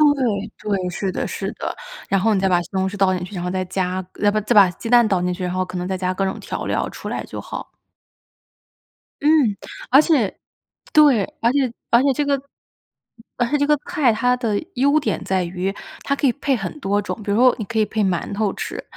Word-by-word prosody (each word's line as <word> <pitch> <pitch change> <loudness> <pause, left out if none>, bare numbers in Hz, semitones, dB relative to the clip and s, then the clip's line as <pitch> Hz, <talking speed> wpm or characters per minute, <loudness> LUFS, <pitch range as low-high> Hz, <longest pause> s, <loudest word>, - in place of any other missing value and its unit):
对， 215 -5 -1 0.3
对， 180 -1 -3
是 190 +1 -3
的 - - -3
是 - - -4
的。 - - -4 0.4
然 195 - +2
后 220 +3 +2
你 195 - +2
再 195 - +1
把 175 -1 +3
西 - - -10
红 190 0 +1
柿 205 - -5
倒 195 -1 +3
进 180 -1 -3
去， 185 +3 -9
然 175 - -4
后 180 - -2
再 185 0 -1
加 185 0 -2 0.2
再 205 - +5
把 215 +1 +1
再 215 +4 0
把 200 -4 +7
鸡 225 +6 -8
蛋 240 -2 +6
倒 190 -4 +1
进 180 0 0
去， 180 0 -6
然 180 0 -2
后 185 - 0
可 185 0 -6
能 180 +1 -3
再 190 - -2
加 185 0 -1
各 195 +1 -1
种 190 - -2
调 - - -5
料 - - -1
出 - - -8
来 - - -3
就 - - -8
好。 - - -7 1.5
嗯， 290 -9 +4 0.3
而 270 +3 +7
且 285 - +1 0.6
对。 290 -9 +6 0.2
而 235 - +3
且 265 -3 +1 0.2
而 235 - +6
且 275 - +4
这 290 +3 -1
个 280 -1 +1 1.0
而 245 - +1
且 295 - +2
这 285 - +2
个 300 0 +3
菜， 265 -6 +3
它 250 +3 +2
的 225 -5 -1
优 285 +4 +3
点 290 - -2
在 190 -1 0
于 180 +2 -3 0.3
它 280 - 0
可 280 - +1
以 240 - +2
配 280 -2 0
很 195 +5 -5
多 205 -5 0
种。 210 +2 -5
比 200 - -2
如 205 - +2
说 250 0 +5
你 215 - -4
可 225 0 -2
以 215 - +4
配 215 0 -1
馒 185 0 -1
头 205 -1 0
吃， - - -5
205 Hz, 260 characters per minute, -21 LUFS, 185-250 Hz, 1.5 s, 把